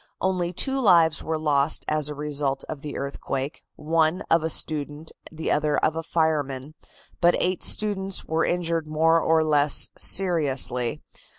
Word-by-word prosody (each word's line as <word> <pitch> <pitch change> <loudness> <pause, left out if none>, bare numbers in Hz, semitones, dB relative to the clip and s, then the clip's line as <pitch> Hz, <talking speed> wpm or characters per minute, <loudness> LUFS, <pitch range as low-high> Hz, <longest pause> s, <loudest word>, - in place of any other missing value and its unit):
Only 180 -2 -1
two 270 +9 -1
lives 170 -9 +3
were 160 0 -3
lost 150 -1 +1
as 150 -1 0
a 150 - -6
result 145 -2 -3
of 150 -3 -7
the 150 - -7
earthquake, 140 0 -5
one 165 +4 0
of 165 - +4
a 160 - -2
student, 150 0 -1 0.2
the 160 0 -4
other 150 0 0
of 155 - 0
a 165 - -3
fireman, 150 -4 -2 0.5
but 175 0 +3
eight 185 -1 -1
students 195 -2 +1
were 160 +1 -1
injured 170 -2 -2
more 160 +2 +2
or 160 0 +2
less 150 -2 +3
seriously. 145 -8 +2
155 Hz, 155 wpm, -24 LUFS, 145-170 Hz, 0.5 s, of